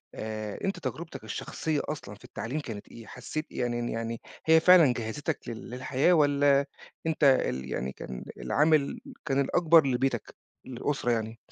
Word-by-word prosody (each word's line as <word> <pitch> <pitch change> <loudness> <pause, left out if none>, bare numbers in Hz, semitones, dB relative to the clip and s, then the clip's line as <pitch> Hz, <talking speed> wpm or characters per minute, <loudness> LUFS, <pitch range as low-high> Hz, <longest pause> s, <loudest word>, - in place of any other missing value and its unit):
آآ 110 -1 -5
أنت 195 -1 -1
تجربتك 165 -1 -6
الشخصية 155 -3 -2
أصلًا 145 -9 -6
في 105 - -20
التعليم 130 +7 -4
كانت 115 -8 -7
إيه؟ 115 - -11
حسّيت 155 +5 -5
يعني 120 -1 -2
ن 120 - -2
يعني 115 0 -4 0.2
هي 160 0 +7
فعلًا 165 -6 +7
جهّزتك 130 +7 -3
لل 115 0 -7
للحياة 130 +6 +1
والّا 145 -2 +4 0.4
أنت 160 -1 -1
ال 65 - +3
يعني 65 +2 -2
كان 65 -1 -8
العامل 150 -1 +2 0.3
كان 135 -3 +1
الأكبر 165 0 +4
لبيتك، 125 -2 -1 0.3
للأسرة 125 0 -2
يعني؟ 110 0 -2
135 Hz, 150 wpm, -28 LUFS, 115-155 Hz, 0.4 s, هي